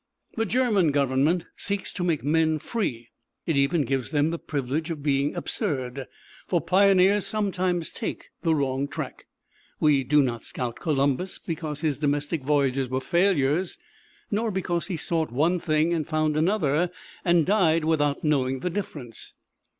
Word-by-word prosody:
The 225 -1 0
German 220 -8 +2
Government 140 +5 +2
seeks 200 -1 -3
to 180 - -3
make 165 -4 0
men 160 +2 +2
free. 130 - -3 0.4
It 165 - 0
even 140 +3 +2
gives 135 0 -1
them 150 +1 +1
the 170 - -3
privilege 145 +3 -3
of 155 -4 -5
being 140 0 +1
absurd; 135 - -3 0.4
for 175 - +2
pioneers 195 +2 +4
sometimes 185 -5 -1
take - - -6
the 165 -2 +2
wrong 135 -1 0
track. 140 - -7 0.5
We 145 -3 +3
do 145 +3 +4
not 120 -3 -3
scout 120 -2 -4
Columbus 145 +3 0
because 155 -3 -5
his 155 -4 0
domestic 145 +1 0
voyages 135 -2 +1
were 130 +1 0
failures; 170 0 +1 0.5
nor 220 +2 0
because 180 -3 -2
he 185 -4 -3
sought 160 -2 -1
one 160 +8 +2
thing 155 0 +1
and 160 -3 -1
found 155 -1 0
another, 165 -1 +2 0.3
and 170 -3 +3
died 165 -6 +3
without 145 -3 +1
knowing 135 -4 +1
the 180 - -2
difference. 150 - -6
155 Hz, 150 wpm, -25 LUFS, 140-180 Hz, 0.5 s, pioneers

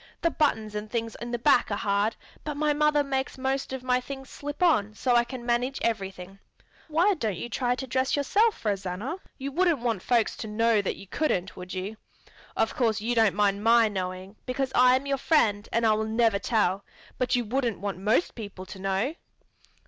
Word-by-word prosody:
"The 335 - +3
buttons 220 -10 0
and 210 0 -5
things 230 0 -3
in 240 - -5
the 240 - -1
back 240 +1 +3
are 205 - 0
hard, 205 +2 +1 0.3
but 300 -2 -4
my 300 0 +2
mother 300 0 +3
makes 270 -1 -2
most 265 +1 -2
of 265 -1 -5
my 250 0 +2
things 270 0 -8
slip 290 +4 -4
on 215 - +3
so 245 +2 +1
I 240 - +5
can 240 0 -8
manage 245 +3 0
everything. 195 -3 -3 0.5
Why 340 +6 +3
don't 220 - -2
you 240 - -5
try 245 +2 0
to 265 - -5
dress 260 +1 0
yourself, 400 - +1
Rosanna? 200 - -2 0.2
You 275 +1 -4
wouldn't 345 +1 +2
want 230 -5 -1
folks 235 0 +1
to 220 - -5
know 225 0 +2
that 195 - -2
you 195 - -11
couldn't, 190 - -1
would 185 +1 -8
you? 195 +4 -4 0.6
Of - - +1
course 225 -5 +1
you 230 +3 -1
don't 225 -4 +3
mind 205 0 +1
my 230 0 +6
knowing, 185 0 -5
because 260 +1 -1
I 250 0 +6
am 260 +2 -1
your 275 -1 -1
friend 220 -9 +2
and 230 0 +1
I 220 - +5
will 215 0 0
never 220 -2 +2
tell; 200 -3 +1 0.4
but 255 0 +1
you 245 -1 0
wouldn't 240 -1 -1
want 200 -2 -4
most 210 - +1
people 200 -4 -8
to 190 - -10
know?" 195 +8 0
235 Hz, 205 wpm, -27 LUFS, 205-265 Hz, 0.6 s, my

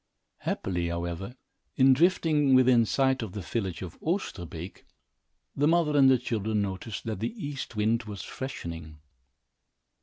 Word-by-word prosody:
Happily, 90 -2 -2
however, 85 +6 -4 0.4
in 135 0 +6
drifting 150 -3 +3
within 125 -3 +5
sight 130 +1 +2
of 110 -5 -5
the 105 - -4
village 95 -2 -3
of 90 - -9
Osterbeek, 95 - -4 0.7
the 145 +2 +2
mother 165 -2 +3
and 135 -2 +7
the 130 - +6
children 110 -3 -1
noticed 100 +1 -4
that 110 -4 -4
the 115 - -3
east 140 -4 -6
wind 110 +2 +1
was 105 -2 -7
freshening. 85 -12 -7
115 Hz, 140 wpm, -28 LUFS, 95-135 Hz, 0.7 s, and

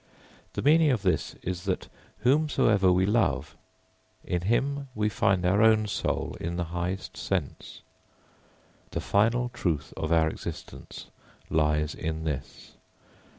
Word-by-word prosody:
] - - -28
The - - -3
meaning 155 +2 +5
of 120 -7 +1
this 90 - 0
is, 90 -1 -4
that - - -2 0.3
whomsoever 125 -8 +3
we 90 +1 +3
love, 110 +3 +1 0.7
in 90 - -2
him 140 +8 0
we 105 0 +1
find 100 -4 +1
our 95 +4 +3
own 110 -1 +5
soul 105 - -2
in 85 +1 -3
the 90 - -1
highest 90 +2 -3
sense. - - -4 1.1
The - - -3
final 115 +4 +2
truth 80 - -2
of 80 - -3
our 80 -1 +4
existence - - -8 0.4
lies 75 -1 +1
in 80 0 -4
this. 70 -3 -5
95 Hz, 135 wpm, -27 LUFS, 85-115 Hz, 1.1 s, meaning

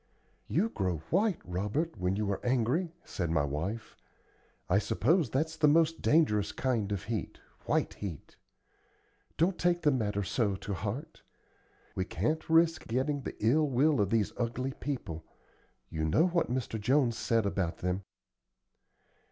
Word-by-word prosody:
"You 205 +8 +1
grow 95 - -1
white, 195 +1 +3
Robert, 105 - -2
when 90 +1 0
you 105 0 -1
are 100 - -3
angry," 130 +8 +1
said 85 -3 -3
my 80 -3 +2
wife. 80 +11 -4 0.7
"I 100 - +4
suppose 160 - +2
that's 155 +7 -1
the 155 -1 +3
most 165 +2 +3
dangerous 105 -11 +3
kind 115 -6 -1
of 100 -4 -2
heat 110 -5 -4 0.3
white - - +1
heat. 90 -8 -7 1.0
Don't 175 +3 +2
take 175 0 +2
the 150 - +5
matter 105 -6 0
so 100 +1 0
to 100 +2 -5
heart. 120 - -5 0.7
We 95 - -1
can't 155 - -2
risk 165 0 +3
getting 135 +5 0
the - - -6
ill 150 +6 +4
will 135 0 +3
of 100 - +1
these 110 -2 +1
ugly 125 +3 -2
people. 115 - -5 0.7
You 80 - -2
know 80 - +3
what 170 -5 +1
Mr. 120 -3 -2
Jones 125 +1 +3
said 115 -2 +1
about 95 -4 -1
them." 90 +2 -1
120 Hz, 150 wpm, -31 LUFS, 100-155 Hz, 1.0 s, the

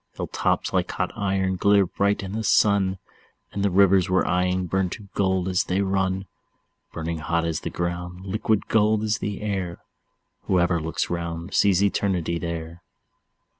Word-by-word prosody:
Hill - - -3
tops - - -1
like - - +1
hot - - -2
iron 95 -2 0
glitter 100 +1 +4
bright 100 +3 0
in 95 - -6
the 110 +2 -3
sun, 100 -3 +3 0.5
And 100 - -3
the 100 - +3
rivers 95 0 +4
we're 95 0 +2
eying 90 +1 +1
burn 95 +1 0
to 100 +1 -9
gold 95 -2 +1
as 90 -1 +1
they 95 +2 0
run; 95 -1 0 0.7
Burning 80 0 -4
hot 85 +2 0
is 80 -2 -1
the - - -5
ground, 90 +1 -4
liquid 105 +1 0
gold 110 0 +2
is 110 0 0
the 105 0 -4
air; 95 -5 -3 0.7
Whoever 90 -2 +2
looks 80 +2 -2
round 85 +1 -4
sees 100 -1 +4
Eternity 90 -4 0
there. 85 0 -5
95 Hz, 165 wpm, -24 LUFS, 85-100 Hz, 0.7 s, glitter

